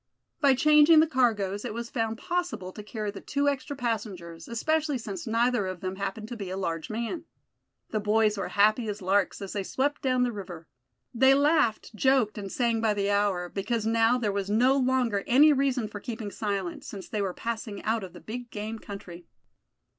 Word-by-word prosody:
By 280 -4 +5
changing 300 +3 +6
the 315 - +6
cargoes 215 -9 +1
it - - -5
was 235 0 -5
found 225 -1 -1
possible 350 - -3
to 210 - -9
carry 210 0 -4
the 200 - -9
two 285 0 -1
extra 285 +1 -1
passengers, 200 -9 -4
especially 300 +5 0
since 335 - -6
neither 230 -2 +1
of 185 -2 -6
them 185 0 -4
happened 200 +2 -4
to 240 - -5
be 200 -5 -6
a 190 - -4
large 165 -4 -3
man. 235 +9 -4 0.7
The 215 - 0
boys 210 0 +2
were 195 - -3
as - - -11
happy 215 +3 +3
as 205 -1 -5
larks 195 +1 +1
as 195 - -6
they 205 - -1
swept 275 +9 -1
down 255 -2 +2
the 245 - +1
river. 180 -6 -8 0.5
They 265 +3 +5
laughed, 285 -7 +2
joked 240 -2 +2
and 195 -2 -6
sang 235 -3 +1
by 220 -2 +2
the 200 0 0
hour, 200 -3 +1
because 215 +4 -2
now 225 +2 +3
there 220 -4 0
was 200 0 -2
no 245 +6 +4
longer 250 -6 +1
any 295 +5 +6
reason 265 -4 +1
for 210 0 -8
keeping 220 -2 -6
silent, 200 -5 -3
since 195 -3 -8
they 215 -4 -2
were 190 -2 -2
passing 220 -3 -5
out 220 -1 0
of 185 - -9
the - - -11
big 245 +2 -7
game 220 +1 -5
country. 180 -5 -9
220 Hz, 200 wpm, -27 LUFS, 200-255 Hz, 0.7 s, changing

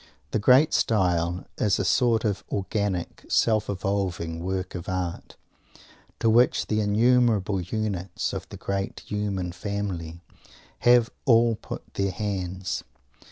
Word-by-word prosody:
The - - +1
great 130 +8 +5
style 90 -4 +1
is 105 -2 +2
a - - -1
sort 115 -3 +2
of 100 -3 -1
organic, 100 -2 -2
self 110 -2 +2
evolving 95 -4 -2
work 95 0 -3
of 90 0 -6
art, 90 -2 -4 0.8
to 115 - +1
which 120 +3 +4
the 110 - 0
innumerable 105 -2 +3
units 95 -2 -3
of - - -5
the - - -9
great 100 0 -3
human 100 -4 -3
family 95 -4 -4 0.6
have 120 -1 +5
all 115 -3 +5
put 110 - -7
their 100 0 0
hands. 95 -3 -3
100 Hz, 125 wpm, -26 LUFS, 90-110 Hz, 0.8 s, great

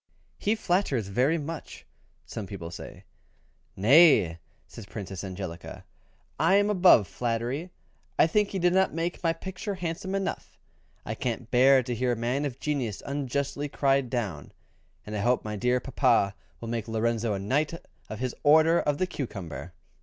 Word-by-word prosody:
"He 210 +2 +1
flatters 175 - 0
very 130 +10 +2
much," 160 +1 -7 0.4
some 105 -3 -6
people 90 -5 -7
said. 85 - -9 0.7
"Nay!" 110 - +6 0.3
says 110 -4 -11
Princess 95 -3 -6
Angelica, 95 -3 -7 0.5
"I 170 +5 +4
am 205 +1 +3
above 180 - +6
flattery, 120 +4 -2
and 180 - -11 0.5
I - - +6
think 205 +5 +2
he 195 - -3
did 175 -1 +2
not 190 -3 +2
make 170 +2 -3
my 165 - +3
picture 190 +4 -5
handsome 180 +2 -4
enough. 195 -1 -4 0.5
I 110 - -3
can't 120 0 -4
bear 130 +1 +6
to 125 0 -3
hear 125 +1 0
a 115 0 -4
man 135 +4 0
of 135 -3 -5
genius 130 - -2
unjustly 140 +1 -2
cried 135 -2 +1
down, 105 - -4 0.5
and 105 - -6
I - - -1
hope 120 +4 +1
my 105 0 -3
dear 125 +4 +1
papa 125 -6 +2 0.3
will 115 - -7
make 115 -1 -3
Lorenzo 115 -1 0
a - - -3
knight 135 +10 0 0.4
of 110 - -5
his 125 +1 -3
Order 160 +3 +5
of 145 -1 0
the 185 - +1
Cucumber." 90 - -6
130 Hz, 165 wpm, -27 LUFS, 110-165 Hz, 0.7 s, Nay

